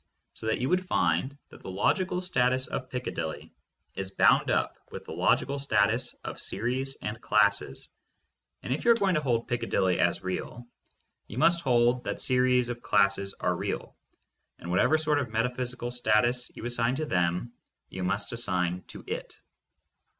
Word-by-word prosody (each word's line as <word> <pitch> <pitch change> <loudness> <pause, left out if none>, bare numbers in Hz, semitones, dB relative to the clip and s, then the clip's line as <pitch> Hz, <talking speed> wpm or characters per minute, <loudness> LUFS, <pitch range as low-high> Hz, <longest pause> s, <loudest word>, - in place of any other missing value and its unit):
So 110 - -7
that 110 - +1
you 125 - -1
would 185 +4 +1
find 90 - +1
that - - -15
the - - -8
logical 180 - 0
status 130 -7 +1
of 130 - -5
Piccadilly 125 -10 -5 0.4
is 95 -1 -4
bound 95 - +4
up - - 0
with - - -8
the - - -7
logical 95 +11 +1
status 105 -7 +1
of - - -6
series 130 +4 -2
and 110 +2 -4
classes, 100 -1 +1 0.8
and 125 - -1
if 145 - -3
you - - +3
are - - +9
going 200 -4 +1
to 155 - +1
hold 120 -5 0
Piccadilly 95 -6 0
as 85 +2 +1
real, 95 +6 -4 0.6
you 105 - -9
must 170 +5 +4
hold 125 -2 +2
that - - -3
series 125 -1 +2
of 120 -1 -5
classes 100 -1 +2
are - - 0
real, - - -4 0.6
and 85 - -7
whatever 100 - +4
sort 155 -2 +1
of 130 -5 -3
metaphysical 125 +2 -2
status 120 +1 +2
you - - -8
assign 120 +1 +1
to 155 +3 -2
them, 90 - 0 0.4
you 95 - -5
must 100 +2 -1
assign 90 -6 -1
to - - -10
it. - - -6
120 Hz, 165 wpm, -28 LUFS, 100-130 Hz, 0.8 s, are